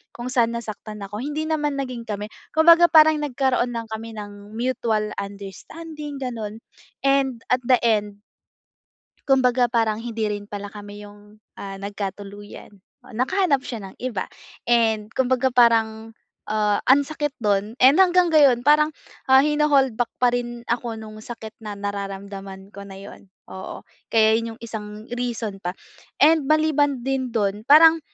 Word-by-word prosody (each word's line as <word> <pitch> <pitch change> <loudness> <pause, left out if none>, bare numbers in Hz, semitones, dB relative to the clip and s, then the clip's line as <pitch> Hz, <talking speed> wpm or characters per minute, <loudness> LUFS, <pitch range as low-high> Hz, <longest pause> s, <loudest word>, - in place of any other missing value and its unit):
kung 245 +1 -6
san 235 -2 +1
nasaktan 215 -2 -7
ako. 205 +2 -6
Hindi 295 +5 -3
naman 300 -2 -1
naging 250 -4 -5
kami 210 0 -5 0.2
kumbaga 335 +2 +7
parang 315 -1 +6
nagkaroon 260 -4 0
lang 230 -1 -6
kami 220 0 -6
ng 205 0 -10
mutual 230 -3 -1
understanding 285 - -8
gano'n, 230 -5 -6 0.4
and 270 -3 +1
at 250 - +4
the 255 - +6
end 210 -3 0 1.1
kumbaga 250 -2 +3
parang 225 -2 0
hindi 225 -1 -4
rin 205 0 -6
pala 205 -1 -7
kami 205 0 -10
yung, 205 +1 -16 0.2
ah, 195 -1 -6
nagkatuluyan, 200 +1 -7 0.3
oh, - - -15
nakahanap 280 - +1
siya 220 -7 -7
ng - - -21
iba 240 -7 -3 0.4
and 225 -2 +1
kumbaga 260 0 +1
parang, 225 -2 +2 0.3
ah, 210 -1 +1
ang 275 +2 +6
sakit 295 -1 -4
do'n 205 +2 0
and 275 +8 +7
hanggang 360 -2 +4
ngayon 275 -6 +5
parang 300 +2 +5 0.4
ha 265 +1 +6
hina-hold 295 -4 +2
back 245 - +2
pa 245 -1 +2
rin 240 -1 -4
ako 235 -1 -2
nung 215 -1 -10
sakit 220 -1 -9
na 210 -2 -7
nararamdaman 195 -1 -6
ko 200 0 -10
na 195 - -10
'yon, 195 0 -12 0.2
oo 190 0 -8 0.2
kaya 220 -1 +4
'yon 230 -1 -6
yung 240 - -27
isang 215 -2 -7
reason 235 -5 -4
pa. 180 0 -5 0.5
And 310 -2 +4
maliban 295 -4 +2
din 260 -2 -2
do'n 205 +1 -1
parang, 320 +3 +7
230 Hz, 150 wpm, -23 LUFS, 210-270 Hz, 1.1 s, kumbaga